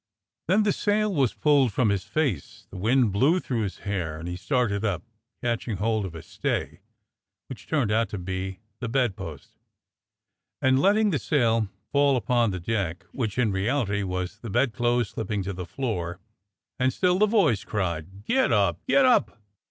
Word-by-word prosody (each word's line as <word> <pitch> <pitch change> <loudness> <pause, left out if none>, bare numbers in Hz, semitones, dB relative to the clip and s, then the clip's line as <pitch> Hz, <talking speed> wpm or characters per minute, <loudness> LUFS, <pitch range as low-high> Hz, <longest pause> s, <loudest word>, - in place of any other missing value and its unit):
Then 200 +5 +4
the 205 -2 +2
sail 210 0 +1
was 135 -8 +1
pulled 140 -5 +3
from 110 +2 +2
his 100 -2 -1
face, 145 - -2
the - - -8
wind 115 +3 +3
blew 140 - +3
through 125 -9 -2
his 100 -3 -3
hair, 90 -6 -2
and 80 +2 -7
he 90 - -3
started 105 0 0
up, 95 -6 -1 0.4
catching 115 -3 -1
hold 110 +1 0
of 85 - -10
a 80 - -8
stay - - -3 0.7
(which - - -9
turned 135 -9 +1
out 115 +1 +2
to 105 - -5
be 95 +1 -4 0.2
the 125 - -4
bedpost), 95 - -3 1.0
and 130 0 +3
letting 210 +2 +4
the 150 - 0
sail 115 -7 +2 0.2
fall 140 -1 +4
below^ - - +2
upon 120 0 +2
the 95 -2 -3
deck, 90 -3 -2
which 115 -5 -3
in 120 -4 +2
reality 105 +1 0
was 90 +1 -3
the 115 - -7
bedclothes 120 +1 +1
slipping 105 -3 -3
to 100 +1 -4
the 90 -1 -6
floor, 90 -8 -3 0.6
and 130 +1 +3
still 180 +5 +1
the 215 - +5
voice 170 - +3
cried: 95 0 -4
"Get 265 - +2
up! - - +2
Get 275 - +5
up!" 105 - +3
115 Hz, 175 wpm, -26 LUFS, 95-135 Hz, 1.0 s, the